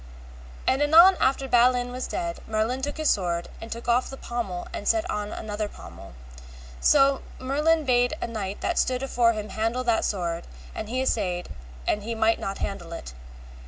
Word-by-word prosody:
And 265 - +2
anon 335 +6 +8
after 270 0 +1
Balin 245 0 +3
was 255 +1 -4
dead, 340 -1 -3
Merlin 220 +4 -1
took 290 +3 -3
his 310 -1 +3
sword, 175 -3 -1
and 225 - -8
took 235 +1 -6
off 240 +1 +2
the 270 - -8
pommel 225 -9 -4
and - - -5
set 335 +1 +2
on 210 0 -3
another 210 0 -4
pommel. - - -12 0.7
So 275 - +4 0.2
Merlin 300 +4 +1
bade 245 +2 +3
a - - -2
knight 205 -4 -5
that 345 - 0
stood 255 0 0
afore 240 -3 +3
him 215 -1 -5
handle 225 +5 -1
that 235 -2 +2
sword, 170 -4 -2 0.3
and 215 - -6
he 255 +2 -1
assayed, 180 -8 -1 0.4
and 210 - +1
he 230 +2 -4
might 225 0 +2
not 195 0 -4
handle 175 -4 -5
it. 60 - -8
235 Hz, 180 wpm, -26 LUFS, 210-265 Hz, 0.7 s, anon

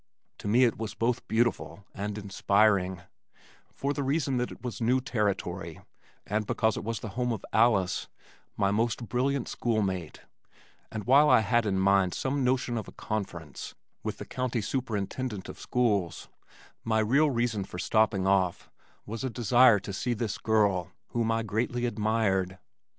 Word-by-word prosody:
To - - -6
me 120 +5 +5
it 115 -3 +2
was 110 -1 -4
both 115 +2 -1
beautiful 115 -3 0
and 105 +1 -4
inspiring, 100 -2 +2 0.7
for 140 +1 -2
the 145 - -3
reason 135 -1 0
that 125 0 -1
it - - -12
was 120 -4 -5
new 125 +3 +3
territory 100 - -2 0.5
and 105 0 -1
because 110 -1 +1
it - - -5
was 115 0 -3
the 110 - -5
home 125 +4 -1
of 110 -4 -4
Alice, 105 -5 +3 0.5
my 100 0 +2
most 115 +2 0
brilliant 130 +1 0
school 115 -3 0
mate, 95 -4 -4 0.7
and 110 -1 -4
while 140 +5 +6
I - - +6
had 115 +1 +2
in 95 -2 +1
mind 95 -1 +3
some 135 +1 -1
notion 125 -2 +1
of 105 - -8
a - - -9
conference 85 - -5 0.3
with - - -4
the - - -7
county 125 -2 -2
superintendent 110 -2 -3
of - - -9
schools, 105 -8 0 0.5
my 110 -1 +1
real 135 +8 +3
reason 120 -5 0
for 90 - -9
stopping 105 0 +2
off 95 -2 +1 0.3
was 115 +3 -5
a 130 - -1
desire 120 -1 +5
to 100 - -6
see 120 +5 -1
this 105 -2 -3
girl 100 -5 +2 0.2
whom 115 -1 0
I 115 0 0
greatly 120 +3 -1
admired. 105 -4 0
110 Hz, 165 wpm, -28 LUFS, 100-120 Hz, 0.7 s, while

